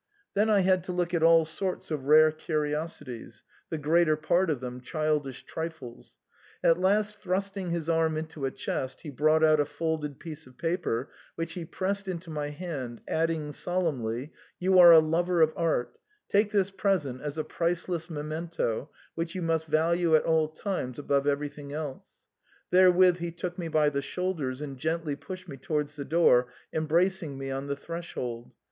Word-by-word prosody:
Then 210 +2 +2
I 205 -2 +5
had 185 -1 +3
to 185 - -3
look 175 -1 -1
at 170 - +1
all 165 0 +6
sorts 180 +2 -3
of 145 -4 -3
rare 155 +2 +7
curiosities, 150 -4 -4 0.3
the 160 - -2
greater 155 +1 +3
part 175 +4 +2
of 145 -5 0
them 125 0 -6
childish 150 -1 -1
trifles; 160 -7 -7 0.5
at 165 +1 +4
last 205 +2 +1
thrusting 195 0 -2
his 170 -2 -2
arm 160 -1 +2
into 155 -3 -4
a - - +1
chest, 130 0 -4
he 150 - -7
brought 155 +3 +3
out 155 -1 +5
a 145 - +3
folded 155 -3 -3
piece 155 -3 -8
of 130 - -18
paper, 165 -7 -2 0.2
which 165 0 -3
he 170 -2 -5
pressed 195 +3 -2
into 170 -2 -5
my 150 -1 -3
hand, 145 -7 -6
adding 160 -2 0
solemnly, 145 -7 -2
" - - -32
You 185 +1 +4
are 175 -1 +10
a 165 - +10
lover 170 +3 +2
of 160 -1 +4
art; 165 -7 -1 0.3
take 205 +1 +3
this 200 -2 +1
present 180 -11 0
as 150 +1 -5
a 155 - 0
priceless 170 0 -2
memento, 155 -4 -3 0.2
which 165 +2 -4
you 185 - -3
must 165 -1 0
value 165 +2 +3
at 155 - +4
all 160 -1 +3
times 155 - -4
above 140 -1 0
everything 145 0 -2
else." 150 -3 -5 0.6
Therewith 180 -1 +6
he 170 -1 -3
took 175 +2 -5
me 170 - -3
by 155 -2 +3
the 140 -1 -2
shoul 185 +6 -2
ders 135 -4 -4
and 135 -3 -7
gently 160 0 -1
pushed 180 +6 -9
me 140 -4 -8
towards 150 +2 -2
the 140 -1 -5
door, 135 -6 +4 0.3
embracing 165 -1 +1
me 135 0 -4
on 135 +1 -4
the 140 - -1
threshold. 140 -7 -6
160 Hz, 180 wpm, -28 LUFS, 145-175 Hz, 0.6 s, are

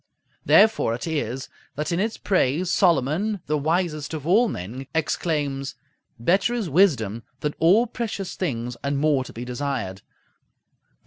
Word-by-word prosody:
Therefore 210 - +4
it 120 - -6
is 135 -6 -3 0.3
that 150 +4 -2
in 170 - 0
its 220 +3 -1
praise, 180 -1 +1
Solomon, 175 +5 +2
the 150 - 0
wisest 155 0 -1
of 150 -2 -6
all 215 +8 +4
men, 125 - -6
exclaims, 145 -4 -1 0.4
"Better 190 - +2
is 225 -6 -2
wisdom 135 - +2 0.2
than 150 0 -1
all 190 +9 +5
precious 220 -5 -4
things, 125 -8 -3
and 140 0 0
more 145 -2 +2
to - - -10
be 120 +2 -7
desired" 125 -7 -3
(Prov. - - -33
150 Hz, 145 wpm, -24 LUFS, 130-185 Hz, 0.4 s, all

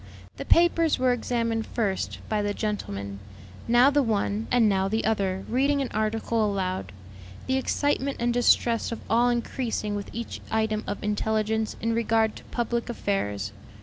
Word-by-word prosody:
The - - -5
papers 335 -2 +4
were 255 -1 +3
examined 230 -2 -1
first, 200 -5 -2
by 215 -1 0
the 205 0 -1
gentlemen, 100 - -4 0.5
now 240 +4 +6
the 290 0 +3
one 215 -2 0
and 240 -3 +4
now 190 -2 +2
the 220 +3 -1
other 195 -3 0
reading 275 +4 +2
an 270 - -1
article 220 +1 0
aloud, 185 - -2 0.5
the 260 - +1
excitement 280 0 0
and 240 0 +1
distress 235 -1 +3
of 230 - -4
all 240 +2 +4
increasing 235 -3 -2
with 205 0 -4
each 235 0 -6
item 220 -1 0
of 205 - -4
intelligence 220 +1 0
in 230 +1 0
regard 225 -1 +2
to - - -12
public 235 0 -2
affairs. 105 - -2
220 Hz, 155 wpm, -26 LUFS, 205-240 Hz, 0.5 s, now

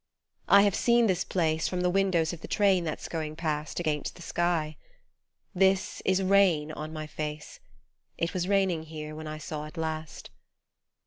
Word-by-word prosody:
I 200 0 +7
have 200 -2 +3
seen 235 +3 +3
this 185 -5 +1
place 160 -3 0
From 180 -1 -2
the 180 - +2
windows 185 -4 +2
of 170 - -9
the - - -7
train 195 -4 +3
that's 155 - -4
going 155 -2 -4
past 155 -1 -3
Against 155 -4 -2
the 175 - -11
sky. 170 -3 0 0.8
This 190 +1 +2
is 190 0 +2
rain 185 -6 +3
on 155 0 -6
my 155 -1 -5
face 150 0 -6 0.6
It 170 0 -1
was 180 -1 -1
raining 190 -4 +2
here 155 -1 -7
when 155 0 -7
I 155 0 -5
saw 155 0 -5
it 155 +3 -12
last. 160 -1 -5
165 Hz, 175 wpm, -28 LUFS, 155-190 Hz, 0.8 s, I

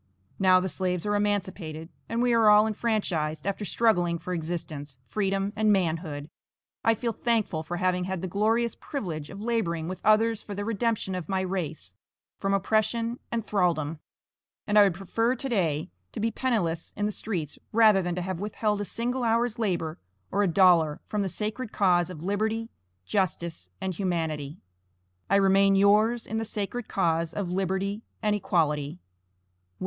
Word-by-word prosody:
Now 185 -1 +6
the 185 - -1
slaves 180 0 -2
are 205 - +1
emancipated, 190 -6 -2 0.2
and 230 +1 0
we 245 -1 +3
are 225 -2 +5
all 210 +1 +7
enfranchised, 200 -9 -1
after 200 +1 -2
struggling 175 -4 +2
for 175 +2 -5
existence, 155 -5 -5
freedom 195 - -1
and 215 0 +3
manhood 160 -6 0 0.6
I 225 0 +4
feel 230 +1 -2
thankful 220 -8 0
for 175 +2 -4
having 180 0 +1
had 190 -1 -3
the - - -1
glorious 225 +5 +1
privilege 165 - -5
of 195 - -9
laboring 205 -8 -1
with 185 +1 -5
others 220 +1 +3
for 205 - -7
the 205 +1 -3
redemption 225 -2 -1
of 180 -1 -5
my 190 -1 +1
race 165 - -4 0.5
from 195 - 0
oppression 220 +4 +1
and 230 -2 -2
thraldom; 165 -6 0 0.7
and 210 0 +4
I - - +10
would 195 -4 +4
prefer 225 +7 0
to 270 - -3
day 165 - 0 0.2
to - - -5
be 225 +2 +1
penniless 200 -10 -1
in 205 - 0
the 210 - 0
streets, 175 -9 -4
rather 215 -3 +6
than 175 -1 -2
to 180 - -2
have 185 -2 -3
withheld 210 0 -1
a - - -2
single 245 +5 -2
hour's 230 0 +1
labor 170 -7 -1 0.3
or 200 - +2
a 200 - +3
dollar 170 -4 +4
from 210 - -2
the 195 - -1
sacred 215 +5 -4
cause 180 -3 +3
of 165 -3 -8
liberty, 220 +4 -1 0.3
justice, 170 - -2
and 190 -1 -2
humanity. 160 -5 -2 0.7
I - - +4
remain 195 0 +5
yours 215 +4 +4
in 220 - -3
the - - -1
sacred 215 +2 -4
cause 165 -2 0
of 190 -4 -2
liberty 190 +3 -1 0.2
and 210 -1 +2
equality, 150 -7 0
WM. 180 - -16
195 Hz, 170 wpm, -27 LUFS, 170-215 Hz, 0.7 s, I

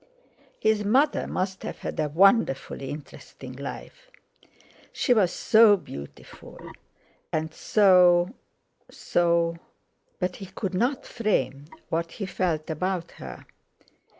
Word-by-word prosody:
His 220 -1 +2
mother 265 +9 +2
must 190 0 -3
have - - -6
had - - -6
a 155 -1 0
wonderfully 160 - +2
interesting 135 -3 -10
life; 140 - -9 0.8
she 250 - +2
was 195 -7 +3
so 220 -1 +5
beautiful, 70 - -11 0.7
and 155 0 -2
so—so—but 175 -2 0
he 195 - -8
could 190 0 -5
not 245 +8 0
frame 140 - -1 0.2
what 165 +1 -2
he 200 - -5
felt 175 -4 -2
about 180 +2 -2
her. 65 -2 -9
180 Hz, 100 wpm, -26 LUFS, 155-210 Hz, 0.8 s, so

